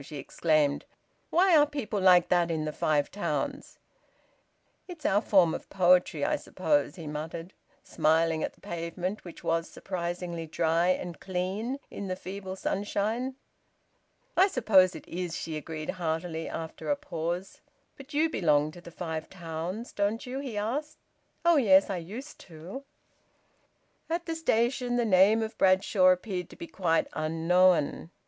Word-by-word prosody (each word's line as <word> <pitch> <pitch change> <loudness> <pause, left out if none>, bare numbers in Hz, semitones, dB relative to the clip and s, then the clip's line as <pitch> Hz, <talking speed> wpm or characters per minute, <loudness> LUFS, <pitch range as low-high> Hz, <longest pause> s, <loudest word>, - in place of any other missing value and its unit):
she 150 +2 -8
exclaimed. 150 0 +1 0.5
"Why 365 +1 +4
are 295 -1 +6
people 265 -9 -3
like 180 -2 +6
that 175 -1 +3
in 160 -2 -1
the 155 - -3
Five 150 -2 +1
Towns?" 205 - -3 1.1
"It's 345 -5 -10
our 205 +2 +3
form 185 -7 +4
of - - -7
poetry, 180 -1 +3
I - - +1
suppose," 295 -1 0
he 165 -4 -9
muttered, 160 +4 -6 0.3
smiling 160 +1 +2
at - - -3
the - - -27
pavement, 175 +4 -4
which 175 - -11
was 165 0 0
surprisingly 175 -2 -4
dry 165 +2 +1
and 180 -1 -1
clean 195 +7 -3
in 200 - -5
the 185 - -2
feeble 190 0 -7
sunshine. 210 +7 -2 1.0
"I 370 +3 +6
suppose 195 - +4
it 160 - -10
is!" 175 -1 -4
she 160 - -5
agreed 155 0 -4
heartily, 165 -2 -3
after 160 -1 -6
a 290 - +3
pause. 175 - -4 0.3
"But 275 +2 -13
you 310 +2 +2
belong 150 - +2
to 175 +2 -13
the 170 - -11
Five 160 -2 -5
Towns, 175 +5 -5
don't 205 +3 -1
you?" 255 +2 -4
he 260 -6 -5
asked. 275 +9 -3 0.5
"Oh 340 -2 +6
yes! 195 -6 +5
I 190 - -1
used 220 - -8
to." 175 - -9 1.2
At 340 +1 -2
the 330 - -2
station 245 -5 +1
the 240 -1 +2
name 210 +2 +5
of 220 - -6
Bradshaw 190 0 +4
appeared 185 -1 +1
to - - -13
be - - -7
quite 170 -2 0
unknown. 165 +1 +2
185 Hz, 155 wpm, -28 LUFS, 165-220 Hz, 1.2 s, are